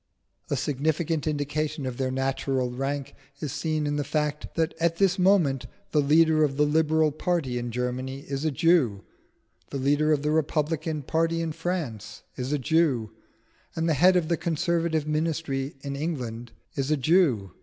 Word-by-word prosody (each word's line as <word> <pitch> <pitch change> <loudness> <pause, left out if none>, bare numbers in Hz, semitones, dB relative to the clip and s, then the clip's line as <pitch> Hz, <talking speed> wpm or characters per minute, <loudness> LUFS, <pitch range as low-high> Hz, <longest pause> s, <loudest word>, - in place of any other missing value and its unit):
A - - +1
significant 155 +2 -1
indication 150 0 -2
of 125 -2 -4
their 130 -1 0
natural 135 -1 -1
rank 135 +2 -3 0.3
is 150 -4 -4
seen 155 +1 -1
in 145 0 -1
the 145 - 0
fact 150 +1 -2
that 160 -1 0
at 165 0 +2
this 190 +1 +2
moment, 175 -9 +3 0.2
the 150 - +3
leader 155 +2 +4
of 135 -2 0
the 150 - +4
Liberal 155 0 +3
party 150 -5 -1
in 120 0 -4
Germany 125 +3 -3
is 140 0 -4
a 160 - +2
Jew, 140 - +2 0.7
the 140 - -4
leader 145 +3 +2
of 150 -1 +2
the 150 - +1
Republican 155 0 0
party 165 +3 0
in 165 -1 -1
France 155 - -4
is 130 +1 -4
a 150 - +2
Jew, 135 -6 +1 0.6
and 165 +1 0
the 160 - +3
head 180 +6 +5
of 175 -3 +2
the 170 0 +1
Conservative 165 -1 0
ministry 150 -3 -1
in 140 0 -4
England 125 -7 -4 0.2
is 135 0 -2
a 155 - +2
Jew. 135 - +2
150 Hz, 170 wpm, -26 LUFS, 135-160 Hz, 0.7 s, head